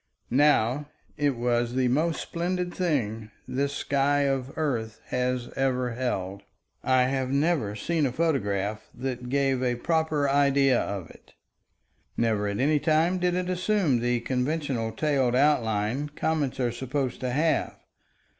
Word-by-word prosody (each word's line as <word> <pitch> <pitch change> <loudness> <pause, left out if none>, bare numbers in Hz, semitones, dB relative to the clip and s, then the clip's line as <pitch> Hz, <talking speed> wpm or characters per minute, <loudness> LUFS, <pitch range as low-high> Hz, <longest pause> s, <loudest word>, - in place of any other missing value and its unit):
Now 145 0 +3 0.3
it 145 -2 +1
was 120 0 0
the 130 -1 +2
most 155 +6 +1
splendid 175 +1 -2
thing 115 - -1 0.2
this 140 +2 -1
sky 140 0 +1
of 135 -2 0
earth 115 -8 -2
has 125 -1 -1
ever 130 -2 0
held. 100 -6 -3 0.4
I 130 -1 +4
have 130 0 -1
never 140 -7 +1
seen 155 +6 0
a - - -3
photograph 110 -9 -1
that 125 -1 -4
gave 135 -1 +1
a 125 -1 +1
proper 155 +1 0
idea 140 -2 +3
of 100 -4 -5
it. - - -20 0.8
Never 110 -3 +1
at 100 0 -2
any 150 +3 +3
time 165 +4 +2
did 180 0 +1
it 180 0 -1
assume 185 - +1
the 120 0 0
conventional 130 -2 -1
tailed 130 -1 +1
outline, 125 -1 +1
comets 145 -2 -1
are 120 -2 +1
supposed 130 +1 -3
to 130 - -2
have. 155 +6 +1
135 Hz, 140 wpm, -26 LUFS, 120-150 Hz, 0.8 s, I